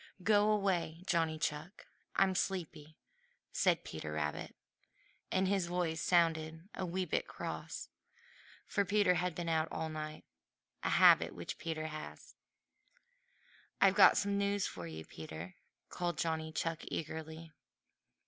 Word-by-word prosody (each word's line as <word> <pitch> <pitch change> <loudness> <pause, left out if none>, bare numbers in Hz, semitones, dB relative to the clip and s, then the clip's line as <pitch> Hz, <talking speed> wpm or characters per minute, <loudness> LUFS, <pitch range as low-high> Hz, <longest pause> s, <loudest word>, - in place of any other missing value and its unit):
"Go 205 +1 +4
away, 185 -5 0
Johnny 165 -3 +1
Chuck! 155 +4 -4 0.3
I'm 195 -1 +4
sleepy," 165 -5 -3 0.5
said - - +2
Peter 80 -1 -6
Rabbit, 75 -1 -3 0.8
and 190 0 +2
his 195 -2 +1
voice 170 -2 -1
sounded 165 -2 +2
just 185 - -23
a 190 - -3
wee 185 +2 -1
bit - - -1
cross, - - -5 0.8
for 200 - +1
Peter 205 -1 +3
had 180 -1 -1
been 175 -1 -4
out 160 -1 +2
all 160 0 -3
night, 155 0 -6 0.6
a - - 0
habit - - +6
which - - -6
Peter 160 -1 -3
has. 155 -1 -8 1.5
"I've 195 -1 +6
got 190 -2 +7
some 200 0 +1
news 200 0 +1
for 85 -2 -5
you, 80 0 -7
Peter," 80 +2 -8 0.3
called 175 -3 -2
Johnny 160 0 -1
Chuck 165 0 -2
eagerly. 160 +1 -5
165 Hz, 135 wpm, -34 LUFS, 155-185 Hz, 1.5 s, got